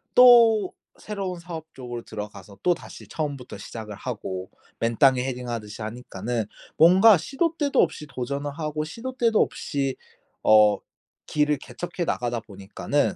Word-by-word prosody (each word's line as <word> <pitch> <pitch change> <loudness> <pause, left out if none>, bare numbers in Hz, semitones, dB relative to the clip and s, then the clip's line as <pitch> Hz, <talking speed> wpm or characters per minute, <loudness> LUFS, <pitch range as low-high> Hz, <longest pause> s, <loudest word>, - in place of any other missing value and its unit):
또 230 -5 +7 0.3
새로운 195 -4 -4
사업 165 -2 -8
쪽으로 120 -2 -7
들어가서 105 -2 -9
또다시 175 -1 -2
처음부터 145 -5 -5
시작을 110 -3 -8
하고 95 -6 -5 0.3
맨땅에 125 +2 +4
헤딩하듯이 120 -5 -5
하니까는 115 0 -4 0.3
뭔가 185 +5 +7
시도 320 - -1
때도 285 -2 +3
없이 160 -2 -1
도전을 140 +3 -3
하고 150 0 -3
시도 235 +11 -6
때도 230 -3 +3
없이 135 -2 -1 0.5
어 105 -1 +6 0.5
길을 150 0 +2
개척해 155 +8 -5
나가다 120 -4 -1
보니까는 100 +8 -2
140 Hz, 315 characters per minute, -25 LUFS, 115-175 Hz, 0.5 s, 또